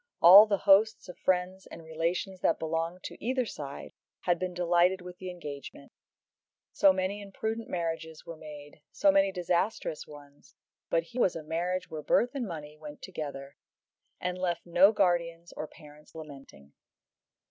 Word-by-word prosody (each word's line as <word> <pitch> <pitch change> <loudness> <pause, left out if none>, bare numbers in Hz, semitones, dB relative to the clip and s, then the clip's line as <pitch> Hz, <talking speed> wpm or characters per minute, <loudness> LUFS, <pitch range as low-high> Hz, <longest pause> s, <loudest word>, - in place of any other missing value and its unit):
All 195 +5 +10
the 200 -1 +1
hosts 200 +2 +4
of 180 - -10
friends 185 +1 -1
and 165 - -11
relations 170 +4 -2
that 165 - +2
belonged 165 +2 -3
to - - -9
either 255 +2 0
side 140 -9 -8 0.3
had 175 -2 +1
been 185 0 -2
delighted 175 +1 +3
with 180 0 -10
the 185 - -6
engagement. 145 - -9 0.8
So 195 - +5
many 190 +2 -2
imprudent 220 +3 -4
marriages 165 -2 -4
were 170 -1 -7
made, 150 -1 -12
so 195 - +4
many 195 0 +3
disastrous 180 -2 -1
ones; 145 -1 -15 0.3
but 165 - +2
here 240 +8 -4
was 185 - +2
a 165 - -6
marriage 175 +3 -2
where 155 -1 -5
birth 240 +10 +2
and 260 -5 -3
money 150 -4 -7
went 150 -1 -10
together, 140 -6 -7 0.6
and 180 0 -3
left 175 -2 -2
no 180 +4 +6
guardians 175 -4 0
or 155 - -5
parents 150 -1 -17
lamenting. 135 - -12
175 Hz, 160 wpm, -29 LUFS, 155-190 Hz, 0.8 s, All